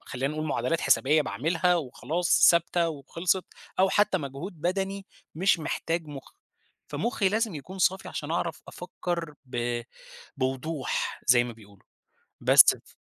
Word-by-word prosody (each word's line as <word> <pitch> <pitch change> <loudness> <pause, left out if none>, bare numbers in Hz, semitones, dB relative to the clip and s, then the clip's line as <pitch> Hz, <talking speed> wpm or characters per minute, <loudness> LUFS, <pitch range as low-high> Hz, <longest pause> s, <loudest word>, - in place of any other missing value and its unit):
خلّينا 135 +3 -3
نقول 155 0 -3
معادلات 145 +4 -1
حسابية 150 +3 +3
باعملها 165 - +1
وخلاص 165 +4 +2
ثابتة 170 0 +1
وخِلصت، 165 +5 -1 0.3
أو 190 - +5
حتى 200 -1 +2
مجهود 150 +5 -7
بدني 195 +3 -2 0.3
مش 185 +1 +3
محتاج 165 +1 -2
مخّ، 145 -2 -10 0.6
فمخّي 230 -5 0
لازم 220 -1 0
يكون 180 +6 -8
صافي 190 +2 +1
علشان 150 +1 -5
أعرف 170 -1 -2
أفكّر 170 -3 -5
ب 120 -1 -2 0.6
بوضوح 135 +2 -2
زي 120 -2 +6
ما 120 -1 -6
بيقولوا 105 -3 -18 0.6
بس - - +7
ف - - -20
165 Hz, 135 wpm, -27 LUFS, 135-180 Hz, 0.6 s, بس